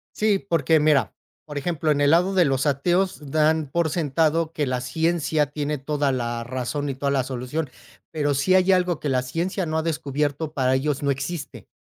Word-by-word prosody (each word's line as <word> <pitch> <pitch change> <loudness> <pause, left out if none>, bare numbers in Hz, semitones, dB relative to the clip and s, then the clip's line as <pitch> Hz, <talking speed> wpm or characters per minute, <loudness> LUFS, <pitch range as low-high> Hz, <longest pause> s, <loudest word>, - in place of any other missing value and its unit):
Sí, 210 -2 +2
porque 165 -5 +1
mira, 140 - +3 0.3
por 150 -2 -7
ejemplo, 160 +1 -1
en 145 -1 +2
el 145 +1 +4
lado 180 +3 +3
de 180 - +5
los 135 +1 +1
ateos, 175 +1 0
dan 155 -1 +2
por 170 +1 +1
sentado 160 +1 0
que 145 -3 -1
la 125 -1 -1
ciencia 155 +2 0
tiene 150 0 -3
toda 145 0 0
la 120 -2 -2
razón 130 +4 -3
y 135 - -2
toda 140 +1 -2
la 135 -2 +1
solución, 130 +4 -4 0.4
pero, 145 -2 0
si 185 +7 +2
hay 185 0 +4
algo 180 -3 +2
que 145 - -3
la 125 -1 +1
ciencia 175 +8 -2
no 155 -1 -3
ha - - 0
descubierto, 150 -1 -2
para 130 -1 +1
ellos 140 +1 -1
no 140 - 0
existe. 140 +2 -4
150 Hz, 200 wpm, -23 LUFS, 135-165 Hz, 0.4 s, de